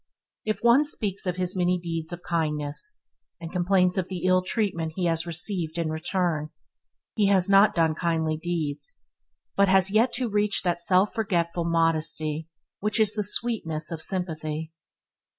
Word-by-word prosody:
If 215 +1 -2
one 240 +5 +6
speaks 205 -10 -2
of 180 - 0
his 180 0 -2
many 180 0 +2
deeds 165 -1 -5
of 175 0 -7
kindness, 155 - -2 0.4
and 165 -1 -7
complains 180 0 +2
of 185 -1 -3
the 180 -3 -5
ill 185 0 +4
treatment 180 -5 -2
he 185 - -1
has 165 0 0
received 170 -1 -2
in 165 -2 -1
return, 160 -1 -1 0.6
he 210 -3 +2
has 190 -2 +4
not 195 +2 +5
done 165 -2 +3
kindly 160 -1 0
deeds, 165 - -4 0.5
but 200 0 +4
has 190 0 +4
yet 225 +4 +3
to 250 -1 -1
reach 210 -1 +1
that 175 -2 0
self 185 +3 +3
forgetful 175 -7 -1
modest 165 -1 +2 0.6
which 210 +2 +1
is 215 -2 +4
the 210 - -1
sweetness 185 -8 -1
of 165 -1 -5
sympathy. 160 -4 -4
175 Hz, 160 wpm, -26 LUFS, 165-200 Hz, 0.6 s, one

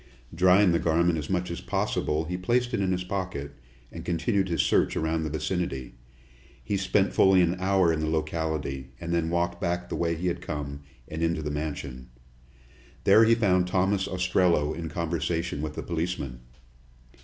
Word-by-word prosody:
Drying 90 +2 +5
the 85 - +2
garment 85 0 +2
as 75 - -6
much 90 -2 -1
as 85 - -5
possible, 75 +2 -1
he 90 +3 -3
placed 120 +7 0
it - - +1
in 95 -1 +1
his 90 0 -1
pocket, 90 -7 -4 0.4
and - - -8
continued 95 +3 0
his 85 - +2
search - - +2
around 80 0 0
the 80 - -2
vicinity. 80 -5 -3 0.7
He 100 - -2
spent 95 +1 +1
fully 95 -1 +5
an 85 0 +2
hour 95 -3 +3
in 80 - -1
the 80 0 -1
locality, 80 -4 -2
and 85 0 -3
then 85 -1 +1
walked 85 0 -1
back 90 +1 -2
the - - -3
way 85 -1 0
he 85 +3 -5
had 90 - -1
come, 70 -1 -5 0.3
and 80 +1 -5
into 80 -1 0
the 75 - -3
mansion. 70 -4 -5 0.9
There 115 - +7
he 115 +1 +5
found 90 -5 +2
Thomas 95 +1 +1
Ostrello 90 -4 +2
in 80 0 -5
conversation 85 -1 -2
with 75 -1 -4
the - - -4
policeman. 85 -7 -3
85 Hz, 180 wpm, -27 LUFS, 80-90 Hz, 0.9 s, There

